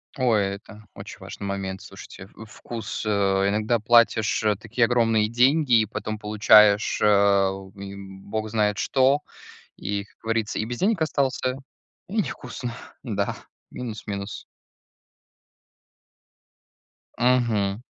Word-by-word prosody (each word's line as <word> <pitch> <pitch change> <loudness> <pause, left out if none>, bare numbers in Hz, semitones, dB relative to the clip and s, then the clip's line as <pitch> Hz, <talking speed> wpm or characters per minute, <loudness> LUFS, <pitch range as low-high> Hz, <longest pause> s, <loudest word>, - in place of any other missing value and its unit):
Ой, 120 -6 +2
это 105 +1 -14
очень - - -10
важный 100 - -8
момент, 95 -1 -4
слушайте, 95 - -11
в 110 - -11
вкус, 115 0 -7
э. - - -1 0.4
Иногда 110 +3 +1
платишь 115 -1 +3 0.2
такие 115 +2 +1
огромные 115 -3 +2
деньги, 130 +3 +3
и 110 - +2
потом 110 0 -5
получаешь 105 0 +4
а, 100 -2 +4 0.3
м, 100 -1 -9
бог 110 +1 -4
знает 105 -2 +1
что, 135 +7 +2 0.6
и, 100 -1 -3
как - - -28
говорится, 110 -1 -2
и 110 - -1
без 120 +1 -5
денег 195 -3 +1
остался, 135 -4 0 0.5
и 205 - -6
невкусно, 125 -6 -6 0.3
да, - - -2 0.3
минус-минус. 105 -4 -6 2.7
Мгм. 115 -4 +1
110 Hz, 115 wpm, -24 LUFS, 100-120 Hz, 2.7 s, получаешь